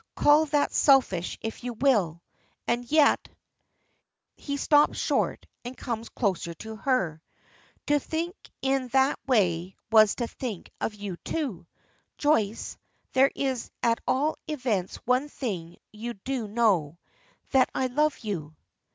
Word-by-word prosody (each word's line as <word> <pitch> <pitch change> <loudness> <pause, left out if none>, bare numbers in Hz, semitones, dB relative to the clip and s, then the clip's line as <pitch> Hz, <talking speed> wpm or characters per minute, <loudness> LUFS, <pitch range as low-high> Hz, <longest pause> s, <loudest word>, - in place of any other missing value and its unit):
"Call 300 +2 +5
that 290 0 +1
selfish 250 - +3
if 225 +2 -5
you 245 -1 -3
will 210 - +1 0.4
and 240 +1 -1
yet 305 -2 +4 0.5
" - - -49
He 280 0 -1
stops 295 +1 +4
short, - - 0 0.2
and 245 +1 -7
comes 230 -2 -4
closer 185 -6 -1
to 220 +6 -8
her. 190 - 0 0.6
"To 290 0 +3
think 330 +5 -3 0.3
in 270 -1 +1
that 265 +1 +3
way 185 -7 +1 0.2
was 215 -2 +6
to 240 - -2
think 230 -5 -6
of 215 - -2
you 200 -4 -6
too. 215 - -4 0.5
Joyce, 225 -8 0 0.4
there 265 +1 +5
is 260 -3 -2
at 230 0 +3
all 290 +4 +1
events 245 - -1
one 255 +4 +2
thing 180 - -5
you 235 +3 -6
do 240 +3 -3
know 200 -9 +1 0.5
that 265 -2 +4
I 260 - +1
love 295 +4 +1
you." 165 -9 -5
240 Hz, 135 wpm, -27 LUFS, 200-275 Hz, 0.6 s, was